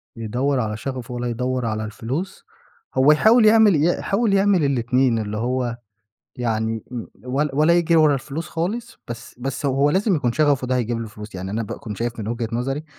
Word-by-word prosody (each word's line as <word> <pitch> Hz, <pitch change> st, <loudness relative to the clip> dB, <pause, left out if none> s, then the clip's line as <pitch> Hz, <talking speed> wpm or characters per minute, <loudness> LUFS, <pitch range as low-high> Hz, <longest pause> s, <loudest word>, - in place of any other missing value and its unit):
يدوّر 125 Hz, +5 st, -1 dB
على 110 Hz, -2 st, -2 dB
شغفه 125 Hz, 0 st, -5 dB
والّا 120 Hz, 0 st, -3 dB
يدّور 125 Hz, +1 st, -2 dB
على 110 Hz, -1 st, -2 dB
الفلوس؟ 130 Hz, -, -5 dB, 0.5 s
هو 135 Hz, +3 st, +6 dB
يحاول 220 Hz, +9 st, +5 dB
يعمل 215 Hz, -3 st, +6 dB
ي 145 Hz, -, +2 dB, 0.2 s
يحاول 205 Hz, +1 st, +1 dB
يعمل 195 Hz, -3 st, +3 dB
الاتنين، 125 Hz, -2 st, +2 dB
اللي 105 Hz, -1 st, -3 dB
هو 120 Hz, +1 st, -1 dB, 0.6 s
يعني 110 Hz, -2 st, -1 dB
و 120 Hz, -2 st, -4 dB, 0.4 s
ولا 150 Hz, -2 st, 0 dB
ولا 155 Hz, +4 st, +4 dB
يجري 170 Hz, -1 st, +2 dB
ورا 155 Hz, -2 st, +5 dB
الفلوس 145 Hz, +4 st, -5 dB
خالص 220 Hz, +8 st, -4 dB
بس 120 Hz, 0 st, -8 dB
بس 135 Hz, +3 st, -3 dB
هو 140 Hz, +2 st, +2 dB
لازم 195 Hz, +4 st, +2 dB
يكون 125 Hz, -5 st, 0 dB
شغفه 145 Hz, -2 st, +2 dB
ده 130 Hz, 0 st, +1 dB
هيجيب 120 Hz, -1 st, -1 dB
له 115 Hz, -, -5 dB
فلوس. 105 Hz, 0 st, -11 dB
يعني 95 Hz, +1 st, -5 dB
أنا 110 Hz, +3 st, -2 dB
باكون 105 Hz, 0 st, -6 dB
شايف 120 Hz, +2 st, -3 dB
من 105 Hz, -, -4 dB
وجهة 115 Hz, 0 st, -2 dB
نظري 135 Hz, +5 st, -2 dB
130 Hz, 190 wpm, -22 LUFS, 115-155 Hz, 0.6 s, هو